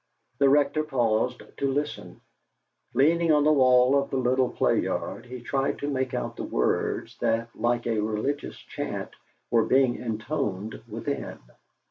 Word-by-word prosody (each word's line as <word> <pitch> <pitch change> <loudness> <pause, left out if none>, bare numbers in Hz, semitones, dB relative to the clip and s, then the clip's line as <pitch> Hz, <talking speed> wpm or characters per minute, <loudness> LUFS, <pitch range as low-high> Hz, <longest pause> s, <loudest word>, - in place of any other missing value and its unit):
The 140 -1 +5
Rector 145 +2 +3
paused 125 -3 0
to 140 -1 0
listen. 145 +2 -4 0.7
Leaning 165 +4 +4
on 150 -1 +4
the 155 +1 +5
wall 130 -1 +5
of 140 - -6
the 135 - -1
little 130 0 +2
play - - +1
yard, 125 - -3
he 125 0 -8
tried 135 +2 -1
to 145 - -4
make 130 -3 -1
out - - -3
the - - -4
words - - -1
that, 115 +1 0
like 120 0 0
a 115 -2 0
religious 110 +7 -2
chant, - - -5 0.4
were 115 -2 +4
being 130 -2 +3
intoned 110 -3 -3
within. 130 +5 -4
130 Hz, 150 wpm, -26 LUFS, 115-140 Hz, 0.7 s, The